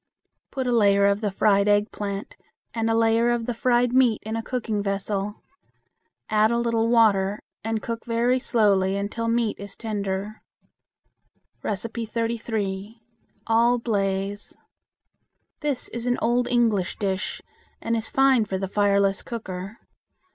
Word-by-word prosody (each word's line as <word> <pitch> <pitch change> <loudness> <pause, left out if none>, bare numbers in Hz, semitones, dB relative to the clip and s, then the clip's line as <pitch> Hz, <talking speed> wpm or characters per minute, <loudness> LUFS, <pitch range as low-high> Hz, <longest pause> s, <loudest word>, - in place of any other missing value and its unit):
Put 265 -2 -3
a 250 - 0
layer 200 -4 +4
of 200 +1 +2
the 210 - 0
fried 200 +1 +2
eggplant 205 -1 -1 0.4
and 225 -1 -1
a 225 - +2
layer 230 +1 +3
of 240 -1 0
the 245 - -2
fried 245 +1 +2
meat 250 -4 +4
in 220 +1 -3
a 225 - -1
cooking 225 -4 -2
vessel. 200 +1 -3 0.8
Add 215 0 +3
a 235 - +1
little 230 -1 +1
water, 210 -4 +3 0.2
and 225 0 -2
cook 230 -1 -4
very 240 +2 +1
slowly 200 -6 +2
until 210 +3 -3
meat 230 -1 0
is 200 0 -9
tender. 205 -1 -4 1.2
33. 225 -1 -3 0.5
All 235 +2 +3
Blaze. 200 -3 -2 1.0
This 290 -4 -1
is 235 +1 -4
an 245 - +1
old 240 +1 +1
English 225 -7 +1
dish, 190 -2 -2 0.4
and 230 0 -1
is 225 -1 -1
fine 270 -3 +4
for 195 -2 -3
the 195 0 -3
fireless 200 0 +2
cooker. 195 -2 -6
220 Hz, 135 wpm, -24 LUFS, 200-235 Hz, 1.2 s, layer